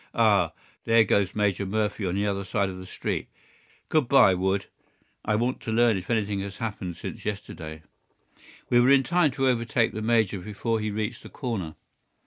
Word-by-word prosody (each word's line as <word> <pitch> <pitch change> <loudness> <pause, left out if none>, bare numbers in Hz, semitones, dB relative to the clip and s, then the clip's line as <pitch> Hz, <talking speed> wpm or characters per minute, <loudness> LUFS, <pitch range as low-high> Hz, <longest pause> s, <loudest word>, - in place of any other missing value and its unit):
Ah, - - +4 0.3
there 115 0 +5
goes 100 -2 +1
Major 105 -2 +1
Murphy 105 0 -1
on 90 - -1
the 100 +1 0
other 100 -1 -1
side 100 0 0
of 95 -1 -7
the 95 - -9
street. - - -3 0.6
Good 155 -5 +2
by, 120 -7 +6
Wood. 95 +2 0 0.6
I 105 - +1
want 120 +4 0
to 110 - -4
learn 115 0 +4
if 95 -1 -6
anything 105 -3 0
has 100 0 -6
happened 100 -6 -4
since - - -7
yesterday." 80 -6 -6 0.8
We 120 - +4
were 125 +2 +5
in 135 -1 +6
time 175 +1 +3
to 135 0 +1
overtake 115 -2 +1
the 110 - -4
major 110 -3 +2
before 105 +4 -2
he 110 0 -2
reached 110 +2 -3
the - - -11
corner. 105 - -4
105 Hz, 185 wpm, -26 LUFS, 95-115 Hz, 0.8 s, by